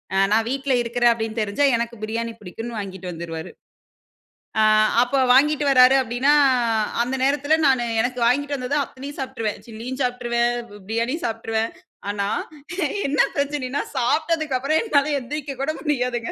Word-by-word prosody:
அ -, -, +3 dB
நான் 220 Hz, +1 st, +3 dB
வீட்ல 270 Hz, +1 st, -1 dB
இருக்கிறேன் 240 Hz, 0 st, +2 dB
அப்பிடின்னு 225 Hz, -1 st, -2 dB
தெரிஞ்சா 215 Hz, +7 st, +1 dB
எனக்கு 235 Hz, 0 st, -3 dB
பிரியாணி 230 Hz, +2 st, -3 dB
பிடிக்குன்னு 225 Hz, +5 st, -7 dB
வாங்கிட்டு 190 Hz, -3 st, -6 dB
வந்துருவாரு. 165 Hz, -1 st, -6 dB, 1.1 s
ஆ -, -, +5 dB, 0.4 s
அப்ப 250 Hz, +3 st, +1 dB
வாங்கிட்டு 295 Hz, +3 st, +4 dB
வர்றாரு 255 Hz, -1 st, +7 dB
அப்பிடின்னா, 255 Hz, +3 st, +2 dB, 0.7 s
அந்த 250 Hz, +3 st, -1 dB
நேரத்தில 285 Hz, +3 st, +2 dB
நானு 260 Hz, -3 st, +2 dB, 0.2 s
எனக்கு 250 Hz, +1 st, -2 dB
வாங்கிட்டு 285 Hz, +4 st, +1 dB
வந்தத 255 Hz, +2 st, -2 dB
அத்தனையும் 275 Hz, +2 st, -9 dB
சாப்பிட்டுருவேன். 255 Hz, -5 st, -3 dB
சில்லியும் 235 Hz, +4 st, -7 dB
சாப்பிட்டுருவேன், 240 Hz, -1 st, 0 dB, 0.3 s
பிரியாணியும் 235 Hz, +9 st, -1 dB
சாப்பிட்டுருவேன். 225 Hz, 0 st, -2 dB, 0.4 s
ஆனா 200 Hz, -1 st, -1 dB, 0.8 s
என்ன 285 Hz, +1 st, -1 dB, 0.2 s
பிரச்சனையின்னா, 280 Hz, -1 st, -1 dB
சாப்பிட்டதுக்கு 305 Hz, +2 st, +1 dB
அப்புறம் 305 Hz, +4 st, +1 dB
என்னால 300 Hz, -9 st, +1 dB
எழுந்திரிக்க 280 Hz, +2 st, -5 dB
கூட 300 Hz, +3 st, 0 dB
முடியாதுங்க. 250 Hz, -6 st, -1 dB
250 Hz, 135 wpm, -22 LUFS, 230-280 Hz, 1.1 s, வர்றாரு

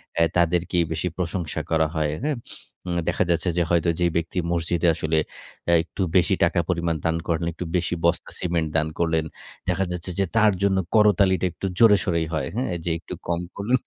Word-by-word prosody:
অ্যা 85 Hz, -, +4 dB
তাদেরকেই 85 Hz, 0 st, +2 dB
বেশি 80 Hz, +3 st, -2 dB
প্রশংসা 90 Hz, -2 st, -2 dB
করা 80 Hz, -1 st, +3 dB
হয়। 75 Hz, -1 st, 0 dB
হ্যাঁ? 150 Hz, -2 st, 0 dB, 0.5 s
উম 85 Hz, 0 st, 0 dB
দেখা -, -, +1 dB
যাচ্ছে 85 Hz, +1 st, +1 dB
যে 85 Hz, -, +4 dB
হয়তো 85 Hz, 0 st, +2 dB
যেই 85 Hz, -1 st, +2 dB
ব্যক্তি 85 Hz, +2 st, -2 dB
মসজিদে 85 Hz, +1 st, 0 dB
আসলে 80 Hz, +1 st, 0 dB, 0.5 s
অ্যা 85 Hz, -, +4 dB
একটু 95 Hz, -, -7 dB, 0.2 s
বেশি 90 Hz, -, +3 dB
টাকা -, -, +2 dB
পরিমাণ 85 Hz, -2 st, 0 dB
দান 80 Hz, 0 st, +2 dB
করেন, 85 Hz, 0 st, 0 dB
একটু 90 Hz, -, -6 dB
বেশি 90 Hz, 0 st, 0 dB
বস্তা 85 Hz, 0 st, +1 dB
সিমেন্ট 85 Hz, -3 st, -1 dB
দান 80 Hz, -1 st, +1 dB
করলেন। 80 Hz, -2 st, +1 dB, 0.4 s
দেখা 95 Hz, +2 st, +1 dB
যাচ্ছে 90 Hz, +1 st, -4 dB
যে 100 Hz, -, +3 dB
তার 110 Hz, -1 st, +6 dB
জন্য 100 Hz, -1 st, +3 dB, 0.2 s
করতালিটা 100 Hz, -3 st, +4 dB
একটু 95 Hz, -, -7 dB
জোরে 110 Hz, -3 st, +7 dB
সরেই 85 Hz, -2 st, 0 dB
হয়। 80 Hz, -, -1 dB
হ্যাঁ? 125 Hz, -6 st, -1 dB
যে -, -, 0 dB
একটু 90 Hz, -, -8 dB
কম 85 Hz, 0 st, 0 dB
করলো, 100 Hz, +5 st, -2 dB
85 Hz, 190 wpm, -24 LUFS, 80-95 Hz, 0.5 s, জোরে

